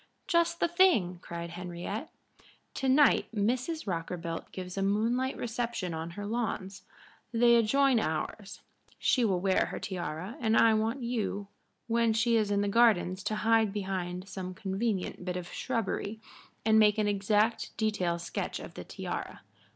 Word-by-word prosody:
"Just 340 -2 +2
the - - +3
thing!" 335 - +3
cried 170 0 -6
Henriette. 180 - -5 0.6
"To 270 - -1
night 280 +2 +5
Mrs. 250 +10 0
Rockerbilt 170 -2 -4
gives 180 -1 -6
a 195 - -1
moonlight 230 +6 +1
reception 230 -6 -3
on 160 +1 -4
her 205 - -4
lawns. 205 -4 -3 0.5
They 235 0 +5
adjoin 255 +2 +4
ours. 190 +3 -3 0.4
She 250 - +2
will 190 -5 +2
wear 190 +1 +2
her - - -5
tiara, 180 +2 -5
and 225 -2 +2
I 225 -1 +6
want 225 +4 0
you 210 -4 -2 0.4
when 230 -1 +2
she 230 +1 +2
is 215 -2 +2
in 200 0 +2
the 205 - 0
gardens 200 -4 +3
to 215 - 0
hide 225 -2 +4
behind 190 -2 -3
some 185 -2 -6
convenient 195 -1 -2
bit 180 0 -3
of 175 -1 -7
shrubbery 220 0 -2 0.5
and 220 0 +5
make 210 -1 +5
an 210 -1 +1
exact 210 +3 +1
detail 195 -6 0
sketch 170 - -4
of - - -9
the - - -7
tiara. - - -6
210 Hz, 155 wpm, -30 LUFS, 185-235 Hz, 0.6 s, I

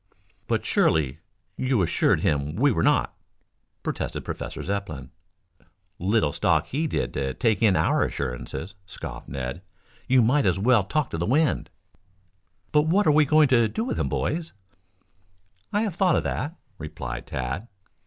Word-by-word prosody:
"But - - 0
surely 75 -2 +2 0.4
you 130 -6 +1
assured 85 - +2
him 75 +1 0
we 140 +6 +3
were 80 - 0
not," - - +2 0.7
protested - - -3
Professor - - -5
Zepplin. 95 -9 -4 0.9
"Little 95 -5 +1
stock - - +2
did 155 +3 -1
he 65 -1 -1
take 110 -5 +1
in 105 -5 +4
our - - +2
assurances," 70 +8 -4
scoffed 95 - -8
Ned. 65 +4 -4 0.5
"You 130 -1 +5
might 125 0 +3
as 90 -1 +2
well 110 0 +3
talk 150 +6 -1
to 80 - -3
the 85 - -1
wind." 150 +5 +1 1.0
"But 150 +1 +3
what 195 +5 +3
are 155 - +5
we 150 0 +5
going 155 0 +4
to 120 -3 +4
do 220 - -3
with 255 - -3
him, - - 0
boys?" 165 +2 -2 1.2
"I 205 +2 +1
have 210 -5 -2
thought 180 0 +3
of - - +1
that," 155 +4 -3 0.2
replied 60 -6 -6
Tad. 65 - -4
110 Hz, 155 wpm, -25 LUFS, -, 1.2 s, You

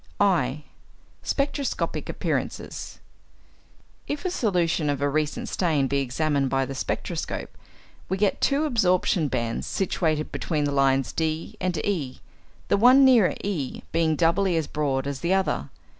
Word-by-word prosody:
(i) 150 -8 +2 0.6
=Spectroscopic 280 -1 -2
Appearances.= - - -3 1.1
If 290 +4 -4
a 365 - 0
solution 175 - +1
of 140 -2 0
a 145 - +1
recent 150 +1 -1
stain 155 -7 +1
be 140 +1 0
examined 140 +1 0
by 135 0 +1
the 135 - -6
spectroscope, 130 - -4 0.5
we 190 - 0
get 200 0 +1
two 285 +2 +2
absorption 185 - +2
bands 115 -3 -2
situated 160 -5 -1
between 155 -4 -1
the 145 - 0
lines 135 -1 +2
D 160 0 -2
and 180 -2 -1
E, 155 -11 -2 0.5
the - - +3
one 255 +5 +7
nearer 240 -7 +5
E 170 -10 -3
being 160 -1 +2
doubly 170 +2 +2
as 160 - 0
broad 140 -3 -1
as 140 -1 -3
the 175 +3 +1
other. 190 -1 -1
160 Hz, 145 wpm, -25 LUFS, 140-195 Hz, 1.1 s, one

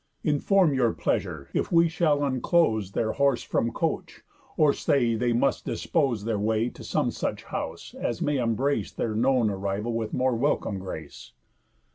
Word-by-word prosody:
Inform 160 +3 +3
your 125 -4 +2
pleasure, - - -2
if - - -1
we 170 -1 +5
shall 160 -3 +1
unclose 130 - +1
Their 110 -1 0
horse 140 -3 +1
from 115 - 0
coach, - - -3 0.3
or 150 -2 +5
say 120 -5 +1
they 120 +2 0
must 125 +3 +1
dispose 135 - 0
Their 110 -3 -1
way 110 +3 +1
to - - -12
some - - 0
such - - -3
house, - - -6
as 120 - -3
may 145 -1 0
embrace 120 -1 0
Their 110 - -2
known 120 -1 +2
arrival 100 +4 -2
with 115 -1 -2
more 130 -1 +1
welcome 115 -5 0
grace?" 80 -5 -8
120 Hz, 160 wpm, -26 LUFS, 110-140 Hz, 0.3 s, we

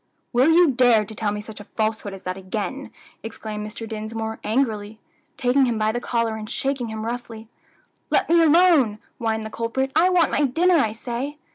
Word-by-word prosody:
"Will 255 +5 +4
you 335 -2 +5
dare 240 -4 +4
to 220 - -10
tell 210 -1 -1
me 210 0 -4
such 215 0 -10
a - - -8
falsehood 215 0 -2
as 195 -1 -10
that 185 0 -3
again?" 210 +8 -5 0.3
exclaimed 215 -1 -6
Mr. 225 +1 -7
Dinsmore, 220 +1 -5
angrily, 215 -3 -1 0.4
taking 260 +1 +3
him 235 -2 -1
by 215 0 +1
the 240 +2 -3
collar 230 -2 -1
and 215 0 -7
shaking 265 -1 -2
him 220 0 -5
roughly. 230 -2 -6 0.6
"Let - - +2
me 335 +1 +5
alone 325 - +5
now," - - -13 0.2
whined 220 -1 -1
the 220 - -7
culprit. 250 +4 -2
"I 340 +4 +5
want 350 -4 +3
my 290 - +2
dinner, 340 +8 +2
I 225 -8 +2
say." 245 +6 -5
230 Hz, 195 wpm, -23 LUFS, 215-270 Hz, 0.6 s, you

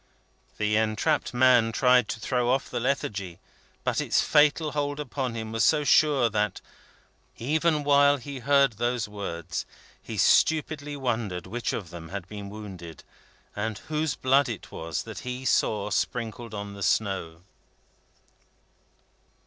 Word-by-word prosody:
The 105 0 +1
entrapped 110 +8 +1
man 125 -2 +4
tried 125 -1 +4
to 110 - -3
throw 125 +1 0
off 130 +2 0
the 120 - -2
lethargy, 100 -8 -2 0.5
but - - 0
its - - +1
fatal 150 +1 +3
hold 145 0 -2
upon 130 -4 -3
him 110 -1 -5
was 115 0 +1
so 150 -2 +4
sure 145 -4 +4
that, 105 -3 -1 0.8
even 155 +4 +1
while 145 0 +5
he 140 +1 -7
heard 140 +1 +4
those 120 0 -1
words, 90 -5 -5 0.4
he - - -7
stupidly 150 -2 +2
wondered 110 - -2
which 120 +1 -3
of 90 -6 -5
them 85 -2 -9
had 95 -1 -6
been 100 -1 -8
wounded, 95 -6 -9 0.5
and 110 0 -3 0.2
whose 150 -2 0
blood 135 +1 +3
it 110 - -7
was 80 -2 -4
that - - -8
he 125 +1 -6
saw 105 -5 +1
sprinkled 115 -1 -2
on 100 0 -6
the 100 - -10
snow. 90 -4 -1
120 Hz, 140 wpm, -26 LUFS, 105-140 Hz, 0.8 s, while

